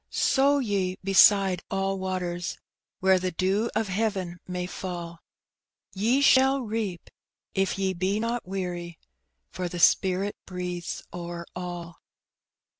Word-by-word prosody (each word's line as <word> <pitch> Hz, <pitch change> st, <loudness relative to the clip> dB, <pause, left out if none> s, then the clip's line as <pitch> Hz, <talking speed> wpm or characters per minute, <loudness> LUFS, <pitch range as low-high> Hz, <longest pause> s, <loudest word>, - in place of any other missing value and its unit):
Sow 280 Hz, +1 st, +3 dB
ye 200 Hz, -7 st, -1 dB
beside 195 Hz, -1 st, +5 dB
all 195 Hz, 0 st, -1 dB
waters, 180 Hz, -2 st, -3 dB, 0.4 s
Where 190 Hz, 0 st, +5 dB
the 185 Hz, 0 st, -1 dB
dew 190 Hz, +6 st, 0 dB
of 220 Hz, 0 st, +1 dB
heaven 190 Hz, -3 st, -2 dB
may 180 Hz, -1 st, -3 dB
fall; 175 Hz, -2 st, -6 dB, 0.7 s
Ye 230 Hz, +8 st, +2 dB
shall 265 Hz, 0 st, +5 dB
reap, 215 Hz, -6 st, -4 dB, 0.4 s
if 195 Hz, -1 st, 0 dB
ye 190 Hz, -1 st, 0 dB
be 190 Hz, +3 st, 0 dB
not 230 Hz, -1 st, -2 dB
weary, 175 Hz, -3 st, -4 dB, 0.5 s
For 180 Hz, -1 st, -3 dB
the 175 Hz, -, -6 dB
Spirit 190 Hz, +3 st, +3 dB
breathes 180 Hz, -1 st, -4 dB
o'er 170 Hz, -1 st, -6 dB
all. 175 Hz, -2 st, -6 dB
185 Hz, 120 wpm, -27 LUFS, 180-205 Hz, 0.7 s, beside